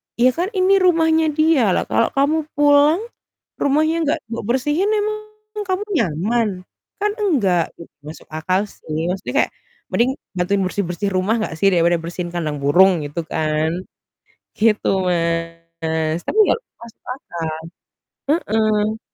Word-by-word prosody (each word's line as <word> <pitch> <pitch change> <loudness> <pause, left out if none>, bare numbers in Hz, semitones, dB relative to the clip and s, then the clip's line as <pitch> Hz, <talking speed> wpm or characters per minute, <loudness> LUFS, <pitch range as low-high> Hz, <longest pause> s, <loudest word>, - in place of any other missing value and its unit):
ya 245 +2 +4
kan 350 +7 -2
ini 375 +1 +4
rumahnya 325 -3 +3
dia, 295 - +3
lah - - +1
kalau 230 - +3
kamu 290 +3 +3 0.2
pulang 290 +5 +4 0.6
rumahnya 310 +3 +2
enggak 295 - 0
be 230 - -3
bersihin 295 +10 +1
emang 425 0 -1 0.5
kamu 375 +2 -1 0.2
nyaman? 210 +9 0 0.5
Kan 415 0 +1
enggak," 195 - +1
gitu. 170 - -12 0.2
Masuk 155 - -10
akal 185 +5 0
sih. 160 +3 -4
Maksudnya 190 +1 -5
kayak - - -18 0.4
mending 245 +3 +2 0.3
bantuin 195 +3 +1
bersih-bersih 195 +1 -2
rumah 190 +4 +1
enggak 190 -6 -3
sih 195 - +3
daripada 170 0 +3
bersihin 175 +1 -5
kandang 155 -4 -2
burung, 175 +2 +4
gitu 145 +4 -4
kan. 155 0 0 0.9
Gitu, 215 -1 +2 0.9
Mas, 160 0 -1
tapi 435 - 0
ya - - +4 0.3
masuk 235 -1 -14
akal, 165 -10 -5 0.8
heeh. 215 -6 +1
210 Hz, 135 wpm, -20 LUFS, -, 0.9 s, ya